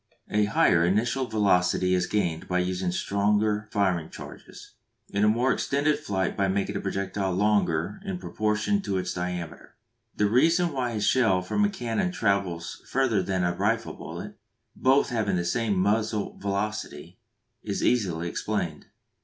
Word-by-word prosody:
A 105 Hz, 0 st, +3 dB
higher 85 Hz, -5 st, +3 dB
initial 115 Hz, +8 st, +1 dB
velocity 90 Hz, -4 st, +2 dB
is 90 Hz, -, +1 dB
gained 85 Hz, -6 st, -1 dB
by 90 Hz, -, 0 dB
using 90 Hz, 0 st, -1 dB
stronger 105 Hz, +3 st, +1 dB
firing 95 Hz, -6 st, 0 dB
charges, -, -, -11 dB, 0.4 s
and 100 Hz, +1 st, +1 dB
a -, -, +5 dB
more 120 Hz, +5 st, +3 dB
extended 145 Hz, +2 st, 0 dB
flight 95 Hz, -2 st, -2 dB
by 100 Hz, -, +1 dB
making 100 Hz, +1 st, -1 dB
the -, -, -3 dB
projectile 95 Hz, -1 st, -2 dB
longer 100 Hz, -, +1 dB
in 195 Hz, -2 st, -4 dB
proportion 110 Hz, -, 0 dB
to 100 Hz, -, -2 dB
its 90 Hz, 0 st, -2 dB
diameter. 90 Hz, -2 st, -5 dB, 0.4 s
The 105 Hz, -, +2 dB
reason 165 Hz, -, +3 dB
why 125 Hz, -3 st, -1 dB
a 110 Hz, -, -2 dB
shell 105 Hz, -5 st, +3 dB
from 205 Hz, -, 0 dB
a -, -, +2 dB
cannon 180 Hz, -, -2 dB
travels 100 Hz, -, -1 dB
further 125 Hz, -6 st, +1 dB
than 95 Hz, 0 st, -1 dB
a 85 Hz, 0 st, +1 dB
rifle 115 Hz, +5 st, 0 dB
bullet, -, -, -8 dB, 0.4 s
both 135 Hz, +2 st, +3 dB
having 110 Hz, -6 st, 0 dB
the 85 Hz, -1 st, -1 dB
same 105 Hz, +1 st, 0 dB
muzzle 105 Hz, +2 st, 0 dB
velocity, 100 Hz, -5 st, -4 dB, 0.4 s
is -, -, -3 dB
easily 90 Hz, -9 st, +1 dB
explained. 85 Hz, -5 st, -3 dB
100 Hz, 155 wpm, -26 LUFS, 90-115 Hz, 0.4 s, a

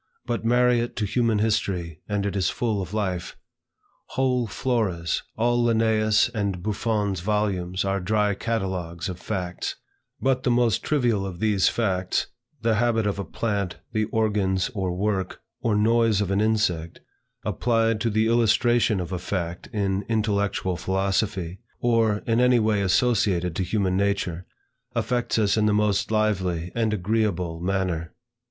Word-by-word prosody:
But 120 Hz, -2 st, -2 dB
marry 125 Hz, +1 st, +3 dB
it 120 Hz, +1 st, -3 dB
to 110 Hz, -, -1 dB
human 115 Hz, +1 st, +1 dB
history, 95 Hz, -7 st, -1 dB
and 100 Hz, -1 st, 0 dB
it 100 Hz, -, -2 dB
is 95 Hz, -4 st, +1 dB
full 110 Hz, -4 st, -1 dB
of 90 Hz, -1 st, -6 dB
life. 95 Hz, -5 st, -3 dB, 0.8 s
Whole 125 Hz, -2 st, +1 dB
Floras, 100 Hz, -8 st, -1 dB, 0.2 s
all 120 Hz, +2 st, +2 dB
Linnaeus' 110 Hz, -2 st, +3 dB
and 100 Hz, -6 st, -2 dB
Buffon's 105 Hz, -2 st, -1 dB
volumes, 95 Hz, -2 st, -1 dB
are 100 Hz, 0 st, 0 dB
dry 105 Hz, +2 st, +1 dB
catalogues 95 Hz, -5 st, -3 dB
of 90 Hz, -1 st, -6 dB
facts; 90 Hz, -4 st, -3 dB, 0.4 s
but 130 Hz, -1 st, +1 dB
the 130 Hz, -, 0 dB
most 120 Hz, -3 st, +2 dB
trivial 120 Hz, -9 st, +1 dB
of 95 Hz, -3 st, -6 dB
these 105 Hz, -3 st, +3 dB
facts, 95 Hz, -5 st, 0 dB, 0.4 s
the 110 Hz, -2 st, +2 dB
habit 115 Hz, -1 st, +2 dB
of 100 Hz, -1 st, -1 dB
a -, -, -1 dB
plant, 100 Hz, -1 st, -2 dB, 0.2 s
the 110 Hz, -1 st, +1 dB
organs, 105 Hz, -2 st, 0 dB
or 95 Hz, -4 st, -1 dB
work, 95 Hz, +1 st, -2 dB, 0.2 s
or 110 Hz, -3 st, +1 dB
noise 115 Hz, 0 st, +3 dB
of 100 Hz, -2 st, -1 dB
an 100 Hz, +1 st, +2 dB
insect, 105 Hz, -7 st, 0 dB, 0.5 s
applied 115 Hz, -2 st, +1 dB
to 115 Hz, -, +1 dB
the 110 Hz, +1 st, +2 dB
illustration 115 Hz, -1 st, +3 dB
of 90 Hz, 0 st, -4 dB
a 90 Hz, -, -2 dB
fact 85 Hz, -1 st, -4 dB
in 100 Hz, -2 st, -1 dB
intellectual 100 Hz, -4 st, 0 dB
philosophy, 95 Hz, -1 st, -1 dB, 0.2 s
or, 115 Hz, -3 st, +2 dB
in 115 Hz, 0 st, +2 dB
any 125 Hz, 0 st, +5 dB
way 110 Hz, -2 st, +2 dB
associated 95 Hz, -4 st, +2 dB
to 95 Hz, -, 0 dB
human 95 Hz, 0 st, 0 dB
nature, 100 Hz, -3 st, -1 dB, 0.5 s
affects 120 Hz, -2 st, 0 dB
us 105 Hz, -1 st, +2 dB
in 105 Hz, 0 st, +3 dB
the 105 Hz, -, +3 dB
most 105 Hz, -2 st, +1 dB
lively 95 Hz, -6 st, 0 dB
and 115 Hz, -2 st, 0 dB
agreeable 95 Hz, -4 st, -1 dB
manner. 90 Hz, -3 st, -2 dB
105 Hz, 150 wpm, -25 LUFS, 95-115 Hz, 0.8 s, any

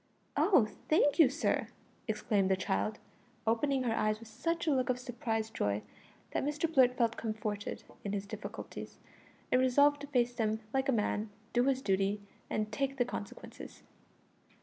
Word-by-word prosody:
"Oh, 360 Hz, -, +5 dB, 0.2 s
thank 300 Hz, 0 st, +4 dB
you, 305 Hz, -6 st, +8 dB
sir!" 295 Hz, +5 st, 0 dB, 0.4 s
exclaimed 210 Hz, -3 st, +1 dB
the 190 Hz, -, +4 dB
child, 195 Hz, +3 st, -1 dB, 0.5 s
opening 260 Hz, +4 st, +2 dB
her 235 Hz, -2 st, +1 dB
eyes 215 Hz, -1 st, +1 dB
with 230 Hz, -1 st, -12 dB
such 335 Hz, +8 st, -2 dB
a 315 Hz, -, +3 dB
look 255 Hz, -2 st, +1 dB
of 250 Hz, -, +2 dB
surprised 235 Hz, -3 st, -3 dB
joy 105 Hz, +1 st, 0 dB, 0.5 s
that -, -, 0 dB
Mr 295 Hz, +3 st, 0 dB
Blurt 255 Hz, -3 st, +5 dB
felt 230 Hz, -2 st, +2 dB
comforted 215 Hz, -2 st, -3 dB, 0.2 s
in 200 Hz, -, -3 dB
his 200 Hz, -1 st, -2 dB
difficulties, 200 Hz, -, -7 dB, 0.5 s
and 255 Hz, -, +5 dB
resolved 285 Hz, +3 st, +4 dB
to 285 Hz, -, -6 dB
face 245 Hz, -3 st, +2 dB
them 220 Hz, -2 st, 0 dB
like 270 Hz, 0 st, +1 dB
a -, -, +6 dB
man, 215 Hz, -2 st, 0 dB, 0.2 s
do 245 Hz, +1 st, +3 dB
his 265 Hz, -1 st, +1 dB
duty, 195 Hz, +1 st, +1 dB, 0.3 s
and 215 Hz, 0 st, -1 dB
take 275 Hz, +4 st, -1 dB
the 245 Hz, -, +3 dB
consequences. 205 Hz, -, -8 dB
235 Hz, 165 wpm, -33 LUFS, 215-270 Hz, 0.5 s, you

